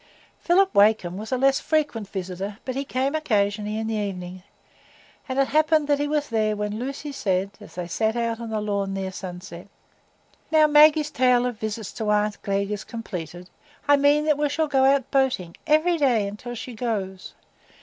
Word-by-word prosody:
Philip 385 +3 +3
Wakem 200 -4 +3
was 215 +3 -7
a 255 - +1
less 270 +1 +3
frequent 290 -10 -1
visitor, 190 +2 -5
but 255 - -3
he 275 +2 -2
came 265 +1 -1
occasionally 210 -7 0
in 220 - -2
the 225 - -2
evening, 185 -3 -4 0.9
and 260 - -3
it 275 -1 +2
happened 310 0 +3
that 290 -1 +2
he 290 - 0
was 295 0 -1
there 215 -2 +1
when 210 +1 -3
Lucy 275 +3 -5
said, 195 -7 -1
as 210 - -13
they 180 -1 -4
sat 220 +5 0
out 230 -1 -1
on 230 -1 -6
the 220 -1 -2
lawn, 200 -2 -2
near 190 -1 -3
sunset,— 180 -1 -8 0.8
"Now 315 -1 +5
Maggie's 300 0 +5
tale 250 -2 +3
of 245 -4 -3
visits 215 -1 -4
to 220 -2 -3
aunt 210 0 +1
Glegg 200 0 -1
is 210 - -3
completed, 180 -6 -7 0.4
I 285 - +7
mean 290 +1 +3
that 300 -2 +2
we 295 -1 +1
shall 315 +3 0
go 270 -2 +3
out 270 -1 +2
boating 255 -11 0
every 320 +3 +3
day 240 -8 +2
until 220 +4 -7
she 245 +2 -7
goes. 205 -5 -4
225 Hz, 190 wpm, -24 LUFS, 200-280 Hz, 0.9 s, I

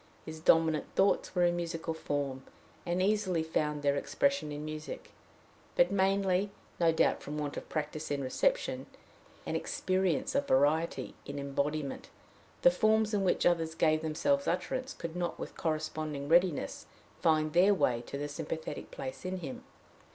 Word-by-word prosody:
His 160 0 -7
dominant 160 -1 +3
thoughts 195 -1 +2
were 180 - +3
in 175 0 +3
musical 165 -1 -3
form, 140 -4 -3 0.5
and 175 +2 +1
easily 190 -5 +1
found 150 -2 -1
their 140 0 +3
expression 280 - 0
in 145 +1 -5
music; 155 0 -7 0.6
but, 175 +2 +4
mainly 195 0 +2 0.3
no 165 -1 +5
doubt 160 - +2
from 150 +1 -5
want 145 -1 -3
of - - -7
practice 155 0 -3
in 140 -1 -1
reception, - - 0 0.6
and - - -2
experience 185 -3 0
of 280 0 +1
variety 150 +5 +2
in 140 - -5
embodiment, 140 +1 -2 0.5
the 175 - +8
forms 215 +3 +2
in 200 -2 +2
which 185 - +2
others 165 -2 +2
gave 155 -1 +3
themselves 280 - +1
utterance 260 0 -2
could 165 0 -6
not 175 -1 -2
with - - -7
corresponding 155 -2 -2
readiness 175 0 +2 0.3
find 155 -1 +2
their 190 +4 +5
way 120 -9 +1
to 140 - -5
the 145 +1 -3
sympathetic 155 0 -5
place 130 -1 -7
in 185 +1 -3
him. 135 -5 -6
160 Hz, 155 wpm, -31 LUFS, 150-185 Hz, 0.6 s, the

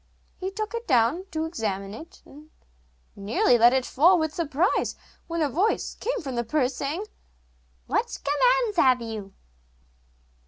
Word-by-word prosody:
He 375 - -4
took 430 +3 -5
it 465 0 -5
down 265 +8 +2
to 320 -3 -2
examine 200 - -4
it, 320 +10 -12
and 300 +2 -15 0.7
nearly 225 +4 +2
let 235 +2 +7
it 260 -1 +1
fall 345 +7 +4
with 315 -2 -1
surprise 330 +3 0 0.3
when 335 -1 -1
a - - +2
voice 370 - 0
came - - -3
from 270 -3 -5
the 240 -1 -1
purse 255 +2 0
saying: 300 +10 -3 0.8
'What - - -1
commands 470 - +2
have 255 -5 +5
you? 220 -4 -7
295 Hz, 150 wpm, -25 LUFS, 240-370 Hz, 0.8 s, let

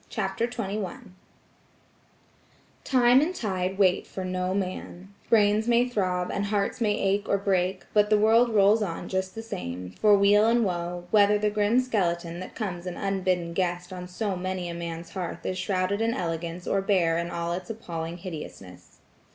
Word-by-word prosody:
CHAPTER 215 +2 -1
XXI 215 0 -5 1.7
Time 250 0 +5
and 345 +5 -1
tide 190 - -2
wait 185 -2 +3
for 190 - -5
no 185 0 -1
man; 190 0 -5 0.2
brains 215 0 +4
may 240 +1 +4
throb, 185 -6 -1
and 200 - -1
hearts 205 +2 -1
may 210 -2 +2
ache 200 +1 0
or 200 - +3
break, 190 -1 0
but 210 -1 +4
the 215 - +5
world 225 +3 +4
rolls 210 0 +4
on 175 -3 -3
just 190 0 -2
the 225 - -6
same, 90 - -6
for 210 - +4
weal 205 +2 +5
and 235 0 +3
woe, 175 -1 -3
whether 210 -1 +5
the 210 0 0
grim 210 +3 +2
skeleton 175 -8 -1
that 185 - -8
comes 185 -5 -4
an 180 - -5
unbidden 185 -3 -1
guest 180 0 -2
on 180 -1 -7
so 195 +2 -3
many 185 0 -3
a - - -4
man's 170 0 -6
hearth 185 -3 -5
is 185 0 -2
shrouded 190 +2 0
in 230 +1 +1
elegance 170 0 -4
or 195 - +1
bare 175 -4 +2
in 170 0 -3
all 170 0 -2
its 180 0 -6
appalling 170 -6 -5
hideousness. 125 - -10
190 Hz, 175 wpm, -26 LUFS, 175-210 Hz, 1.7 s, Time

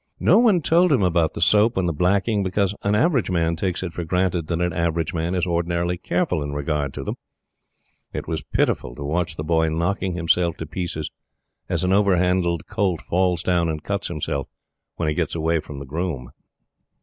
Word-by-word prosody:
No - - +5
one 210 -9 +4
told 170 +3 +4
him 125 -8 +3
about 85 -3 +2
the - - -4
soap 105 +2 +4
and 95 -2 +1
the 85 - 0
blacking 100 +6 +1
because 100 +1 0
an 100 +1 +1
average 135 - +2
man 85 -2 +1
takes 90 +2 -2
it 85 -3 -4
for 85 - -4
granted 90 -1 0
that 85 0 -1
an 90 -1 0
average 85 0 -1
man 85 +2 -1
is 90 -1 +1
ordinarily 85 0 0
careful 90 -2 -1
in 70 0 -4
regard 75 -1 -1
to - - -4
them. - - -4 0.9
It - - -5
was - - -2
pitiful - - -1
to 70 - -7
watch 80 +3 -1
The 75 - -4
Boy 80 0 +2
knocking 90 +3 -1
himself 85 0 +1
to 80 - -5
pieces, 80 -2 -4 0.6
as - - 0
an 90 +1 +2
over 100 -1 +4
handled 90 -2 +1
colt 100 -5 0
falls 90 -1 0
down 85 -2 +2
and 75 -1 -4
cuts 100 0 -2
himself 70 -2 -3 0.5
when 85 - -2
he 75 - +1
gets - - -1
away 80 0 +1
from 75 -1 -8
the 70 - -7
groom. 75 -4 -4
85 Hz, 200 wpm, -23 LUFS, 80-95 Hz, 0.9 s, No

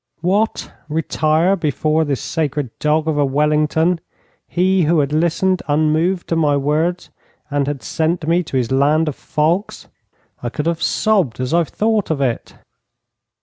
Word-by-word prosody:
What, 200 +6 0 0.2
retire 160 +3 +1
before 155 -1 0
this 140 -3 -2
sacred 145 -5 -2
dog 155 +1 +1
of 155 -2 0
a - - +4
Wellington 150 +4 +1 0.5
he 185 0 +2
who 165 +1 +3
had 145 0 0
listened 175 +4 +1
unmoved 155 +5 +1
to 165 - +1
my 150 -3 +2
words, 155 +6 -1 0.4
and 140 -1 0
had 140 -5 -4
sent 160 +3 -1
me 170 +2 +3
to 135 - -3
his 125 -1 -1
land 150 +4 +2
of 150 - -2
fogs? 165 +6 -2 0.5
I 120 - -3
could 150 +5 -4
have 170 0 -1
sobbed 190 - +1
as 130 +2 -2
I 170 0 +4
thought 215 +4 0
of 160 -3 -1
it. 130 -4 -2
155 Hz, 155 wpm, -18 LUFS, 145-170 Hz, 0.5 s, a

